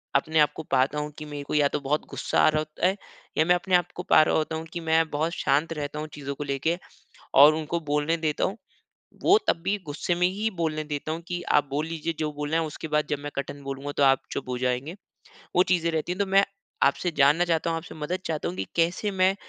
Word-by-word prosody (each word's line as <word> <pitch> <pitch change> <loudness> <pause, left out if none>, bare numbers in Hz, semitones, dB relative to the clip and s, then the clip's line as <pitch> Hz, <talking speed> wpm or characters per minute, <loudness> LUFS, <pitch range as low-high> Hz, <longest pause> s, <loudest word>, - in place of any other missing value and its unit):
अपने 155 +3 +2
आपको 150 +1 +2
पाता 135 +3 +2
हूँ 150 0 -4
कि 150 - -7
मेरे 145 -1 -6
को - - -6
या 145 -1 +5
तो - - -5
बहुत 150 +1 +1
गुस्सा - - -1
आ - - +6
रहा 155 - +1
होता 155 +3 -1
है, 190 - +1 0.4
या 155 - +4
मैं 180 +1 +5
अपने 180 +1 +1
आपको 180 0 0
पा - - +8
रहा - - +1
होता 160 0 0
हूँ 160 - -5
कि 175 - -3
मैं 160 -1 +2
बहुत 155 +3 -1
शांत 155 +3 +1
रहता 150 -1 -4
हूँ 155 - -4
चीज़ों 140 -1 -5
को 145 - -4
लेके, 145 +5 -1 0.6
और 145 +3 +8
उनको 160 +2 -2
बोलने 150 +1 0
देता 155 -2 -1
हूँ। 200 - -1 0.7
वो 400 - +6
तब - - +4
भी 200 +2 +1
गुस्से 150 +4 -1
में 180 +1 +2
ही 205 +4 -1
बोलने 155 -2 -1
देता 150 +1 -4
हूँ 165 - -4
कि 175 -1 -3
आप 145 - +5
बोल 145 +3 -1
लीजिए 165 0 -3
जो 155 -1 -1
बोलना 150 +2 -2
है 165 - +2
उसके 155 +1 -7
बाद 150 0 +1
जब 145 - 0
मैं 145 +1 -6
कठिन 140 +1 -5
बोलूँगा 140 +1 -5
तो 145 - +2
आप 135 -1 +5
चुप - - -4
हो 125 - -2
जाएँगे, 125 +6 -1 0.6
वो 180 - +6
चीज़ें 170 -3 +1
रहती 160 +2 -2
है। 180 - -3
तो 200 - +2
मैं 195 +1 +4 0.4
आपसे 170 +5 +2
जानना 145 +5 +5
चाहता 165 -1 0
हूँ, 165 - 0
आपसे 165 - -9
मदद 160 +4 -3
चाहता 155 - -2
हूँ 90 - -4
कि 95 - -2
कैसे 175 +5 +1
मैं 190 0 +3
155 Hz, 250 wpm, -26 LUFS, 145-170 Hz, 0.7 s, पा